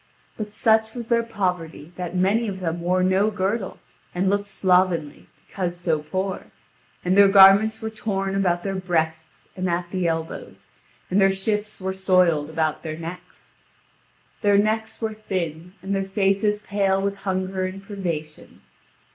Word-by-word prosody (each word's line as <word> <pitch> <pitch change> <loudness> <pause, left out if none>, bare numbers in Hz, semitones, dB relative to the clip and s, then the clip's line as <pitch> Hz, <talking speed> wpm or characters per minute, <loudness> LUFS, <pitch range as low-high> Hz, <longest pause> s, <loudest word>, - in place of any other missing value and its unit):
But 210 -1 -6
such 220 +1 +2
was 235 -2 -6
their 235 -1 +3
poverty, 180 -7 -3
that 180 -1 -5
many 200 +6 +2
of 190 -2 -4
them 170 -1 -3
wore 180 +2 +1
no 190 +3 +3
girdle, 200 0 -2 0.4
and 190 +2 +1
looked 200 0 0
slovenly, 180 -5 +1 0.2
because 175 -2 -4
so 165 -3 0
poor; 185 +5 -3 0.6
and 180 +1 +2
their 200 0 +8
garments 200 +3 +6
were 220 - -3
torn 195 -3 -2
about 175 -3 +1
their 195 - -2
breasts 160 -4 -3
and 185 -1 -2
at 175 0 -2
the 185 -2 0
elbows, 165 0 -4 0.5
and 195 +2 +3
their 195 0 +5
shifts 210 +2 -2
were 190 0 -3
soiled 180 -5 +2
about 160 -1 -1
their 155 -1 -5
necks. 165 +2 -10 0.9
Their 205 -1 +4
necks 220 +2 0
were 220 -1 -1
thin, 180 -5 -4
and 195 +1 -2
their 195 0 0
faces 195 +1 +1
pale 200 -2 0
with 200 0 -2
hunger 190 -1 -2
and 195 +1 -8
privation. 170 -7 -6
190 Hz, 155 wpm, -23 LUFS, 175-200 Hz, 0.9 s, their